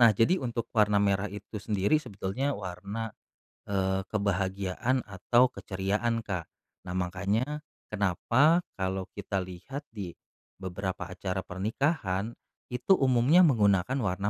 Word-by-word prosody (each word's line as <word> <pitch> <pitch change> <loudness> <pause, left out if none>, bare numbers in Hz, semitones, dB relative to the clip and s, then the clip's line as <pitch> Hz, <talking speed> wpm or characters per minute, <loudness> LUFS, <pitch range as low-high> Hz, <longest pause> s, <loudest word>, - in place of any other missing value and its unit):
Nah, 115 -2 +9
jadi 170 +11 +4
untuk 120 -2 -2
warna 105 -2 +4
merah 100 0 +2
itu 105 +1 -7
sendiri 105 +7 +2
sebetulnya 125 +3 -2
warna, 100 +4 -5 0.6
eee, 95 -1 +1
kebahagiaan 100 +4 0
atau 120 +6 +3
keceriaan, 105 +4 -1
Kak. 90 -5 -3 0.4
Nah, 90 - -3
makanya 100 +11 -1 0.3
kenapa 120 - +3 0.2
kalau 95 0 -1
kita 100 -1 -2
lihat 95 - -7
di 100 -6 -6 0.5
beberapa 95 0 -3
acara 95 +1 -3
pernikahan, 105 - -1 0.4
itu 125 +10 +3
umumnya 135 +7 +5
menggunakan 105 - +3
warna 100 -1 0
100 Hz, 120 wpm, -29 LUFS, 95-120 Hz, 0.6 s, Nah